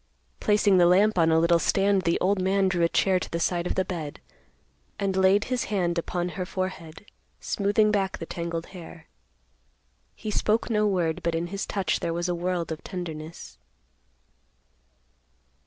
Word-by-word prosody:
Placing 205 -2 +3
the 175 - +6
lamp 195 +2 +4
on 165 -1 +4
a 160 - +4
little 170 +1 +4
stand, 195 +2 +2
the 170 - +2
old 190 +1 +1
man 190 +1 +2
drew 175 -2 +1
a 170 - +3
chair 190 +1 +2
to - - -6
the 170 - -3
side 175 0 0
of - - -2
the 190 - +1
bed, 160 -6 -5 0.8
and 195 -2 -1
laid 190 +2 +4
his 255 -2 -2
hand 175 -4 0
upon 175 +1 -2
her 185 +1 -4
forehead, 185 -2 -5 0.3
smoothing 210 +1 +1
back 195 -2 0
the 165 - -6
tangled 170 0 -4
hair. 170 -2 -11 1.1
He 215 - -5
spoke 220 +3 0
no 210 -1 +2
word, 175 -5 0
but 170 -1 -1
in 165 +1 -1
his 200 - -3
touch 190 -5 -1
there 165 - -2
was 175 +1 -1
a 175 - 0
world 175 -1 -2
of 160 - -6
tenderness. 165 - -7
180 Hz, 170 wpm, -26 LUFS, 170-195 Hz, 1.1 s, the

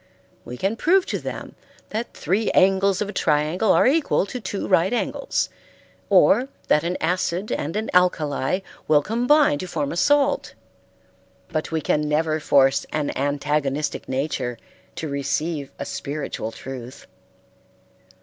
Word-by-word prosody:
We 125 - -7
can 200 - -1
prove 370 +6 +3
to - - -3
them - - -7 0.4
that 225 +3 -4
three 195 +7 0
angles 195 +1 +3
of 200 - -7
a - - -6
triangle 155 +6 +1
are - - +4
equal 285 - +2
to 245 +5 -6
two 205 - -4
right 185 +1 +3
angles, 245 - -1 0.6
or 255 - +5 0.2
that 150 - +4
an 175 +2 -1
acid 180 +3 -1
and 160 +5 -2
an 220 +1 -2
alkali 175 -2 +2 0.3
will 150 -1 +4
combine 245 - +3
to 185 - -5
form 150 -5 -2
a - - -4
salt; 285 +8 +2 0.9
but 155 -2 -3
we 160 -1 0
can 150 +1 0
never 155 +1 +1
force 135 -2 +3
an 150 -2 -2
antagonistic 145 +1 -1
nature 130 -3 -2 0.4
to 160 - -4
receive 140 +1 -2
a - - -5
spiritual 140 -6 -4
truth. 125 +1 -9
160 Hz, 140 wpm, -23 LUFS, 145-200 Hz, 0.9 s, or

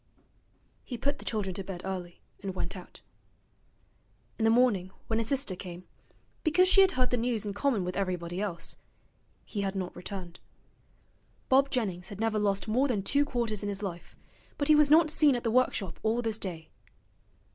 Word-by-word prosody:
He 245 - -6
put 285 +4 -1
the - - -11
children 205 -4 -1
to 195 - -4
bed 185 -1 -7
early, 180 -2 -5 0.2
and 190 -1 -4
went - - -3
out. - - -11 1.4
In 225 - +2
the - - +5
morning, 225 -6 +3 0.2
when 225 0 0
his 225 - -1
sister 270 -8 -1
came, 180 -1 -8 0.6
because 360 +3 +4
she 390 +1 +6
had 380 -1 +5
heard 255 -1 +1
the 245 - +2
news 230 -2 -1
in 205 - -3
common 210 -1 +1
with 180 0 -3
everybody 180 -2 -2
else, 185 -5 -4 0.7
he 205 - -3
had 195 0 -2
not 185 -2 -3
returned. 180 -1 -7 1.1
Bob 275 +1 +5
Jennings 195 -9 -2
had 200 - -8
never 225 -1 +1
lost 200 0 0
more 250 +6 +2
than 215 -7 0
two 285 +7 +3
quarters 235 -6 -2
in 205 - -2
his 200 +1 -4
life, 175 -3 -6 0.4
but 285 +1 0
he 305 - +8
was 300 -1 +5
not 310 +1 +6
seen 300 -4 +4
at 240 - -3
the 230 - +1
workshop 220 -8 +1
all 225 +2 +1
this 225 -1 -1
day. 165 -6 -5
215 Hz, 190 wpm, -29 LUFS, 190-255 Hz, 1.4 s, he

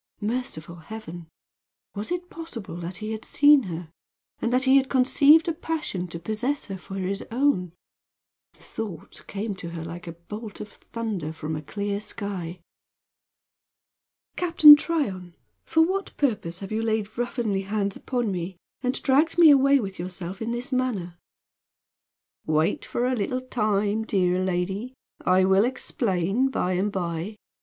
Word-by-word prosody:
Merciful 210 -7 -4
heaven! 175 -2 -9 0.7
Was 210 +8 -5
it 355 0 -3
possible 285 - -7
that 175 +1 -6
he 215 +2 -5
had 220 0 -5
seen 290 -1 +6
her, 165 -1 -6 0.5
and 235 - 0
that 255 +1 +3
he 265 +1 +6
had 270 -1 +2
conceived 285 +5 +5
a 335 - +1
passion 305 - -3
to 170 - -6
possess 220 - -2
her 195 -2 -6
for 195 - -9
his 195 +1 -2
own? 230 - +1 0.8
The - - -23
thought 205 -8 -7
came 205 +1 -3
to 170 - -7
her 165 -1 -6
like 170 +2 -8
a 170 - -5
bolt 210 +6 -9
of 210 - -7
thunder 210 -11 -5
from 160 0 -5
a 150 - -4
clear 200 +6 -3
sky. 185 -5 -6 1.7
"Captain 330 -4 +9
Tryon, 200 - -2 0.3
for 320 - +4
what 385 +4 -2
purpose 205 -10 -1
have 195 - -7
you 220 +1 0
laid 220 -2 -1
ruffianly 235 -5 -1
hands 200 -1 -1
upon 245 -5 -2
me 180 0 -4 0.2
and 255 0 0
dragged 290 +5 +3
me 330 -3 +9
away 275 0 +5
with 195 -6 -5
yourself 180 +2 -5
in 225 - -2
this 240 +3 -4
manner?" 205 -10 -1 1.3
"Wait 155 +4 +1
for 240 - -1
a 255 0 +1
little 250 +4 -1
time, 215 -3 0
dear 185 -3 +1
lady. 190 +7 -2 0.3
I 185 +1 +4
will 190 +1 +5
explain 230 -2 0
by 185 -8 -1
and 195 +3 0
by. 175 +2 -3
210 Hz, 155 wpm, -25 LUFS, 180-255 Hz, 1.7 s, Captain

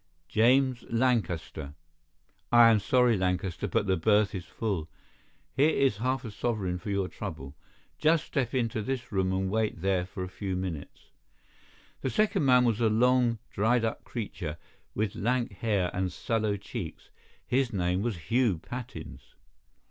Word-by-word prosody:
"James 125 +4 +3
Lancaster." 95 - -1 0.8
"I 120 -1 +8
am 110 - +4
sorry, 125 +3 +3
Lancaster, 90 -2 -1
but - - 0
the 95 -1 +1
berth 105 +3 +3
is 90 -3 -5
full. 95 -8 -3 0.7
Here 140 +4 +5
is 135 -8 +2
half 130 +3 -1
a 110 - -5
sovereign 100 -5 -2
for 105 - -7
your 100 -2 0
trouble. 80 -9 -7 0.4
Just 155 0 +3
step 130 -1 -2
into 115 -3 0
this 125 +1 -4
room 95 -2 +1
and 95 0 0
wait 110 -5 -1
there 95 -2 +1
for 95 0 -6
a - - -4
few 95 0 -4
minutes." 90 -5 -6 0.9
The 130 - -1
second 205 - +1
man 125 -1 +5
was 115 -1 +1
a 115 - +4
long, 120 +1 +3
dried 115 +3 +2
up 115 - -3
creature, 90 -9 -5 0.4
with 105 -1 -1
lank 120 +2 0
hair 100 -5 0
and 95 0 -1
sallow 110 +1 -1
cheeks. 100 - -7 0.3
His 130 0 +1
name 90 -1 0
was 110 -3 -2
Hugh 120 -7 +3
Pattins. 80 - -9
110 Hz, 155 wpm, -29 LUFS, 95-125 Hz, 0.9 s, I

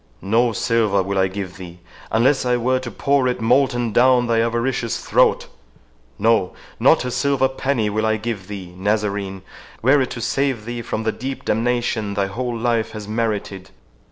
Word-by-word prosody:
No 115 +5 +2
silver 110 -3 +1
will 100 +1 -1
I 95 - +3
give 95 -1 -6
thee, 90 -2 -10 0.3
unless 130 +5 +3
I 125 -1 +1
were 130 +2 +1
to 130 -1 -6
pour 135 +4 +1
it 125 - -1
molten 120 -1 +2
down 125 +1 +4
thy 115 -1 +2
avaricious 115 0 -1
throat—no, - - -1 0.3
not - - +4
a 125 - -2
silver 140 0 +1
penny 130 -3 -1
will 110 +1 0
I 110 0 +1
give 105 -3 -5
thee, 95 -4 -8
Nazarene, 100 -1 -2 0.4
were 135 +3 +5
it 130 - -1
to - - -6
save 130 -1 -1
thee 120 0 -4
from 110 -1 -4
the 110 - +1
deep 130 +5 -6
damnation 115 -2 0
thy 100 0 +1
whole 120 +4 -3
life 115 -1 0
has 105 -2 -7
merited! 105 -4 -3
115 Hz, 170 wpm, -21 LUFS, 100-125 Hz, 0.4 s, were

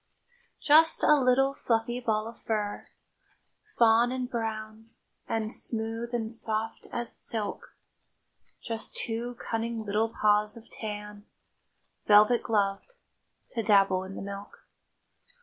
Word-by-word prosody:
Just 315 +2 +5
a - - +7
little 270 -1 +3
fluffy 240 -1 -1
ball 220 -3 -1
of 230 0 -10
fur, 210 -2 -3 0.9
Fawn 235 +1 +5
and 255 -1 -2
brown, 220 -2 -5 0.4
and 220 0 -1
smooth 225 +1 -3
and 225 -2 -2
soft 225 -1 -4
as 240 -1 -4
silk; 215 -3 -5 0.9
Just 225 -2 -5
two 235 +2 -3
cunning 230 -1 -3
little 215 +2 +1
paws 210 0 +2
of 230 0 -14
tan, 210 -1 -7 0.8
Velvet 210 +3 +6
gloved, 205 - -1 0.6
to 230 - -2
dabble 195 -3 +4
in 190 +1 -8
the - - -6
milk. 200 0 -9
225 Hz, 115 wpm, -28 LUFS, 210-235 Hz, 0.9 s, a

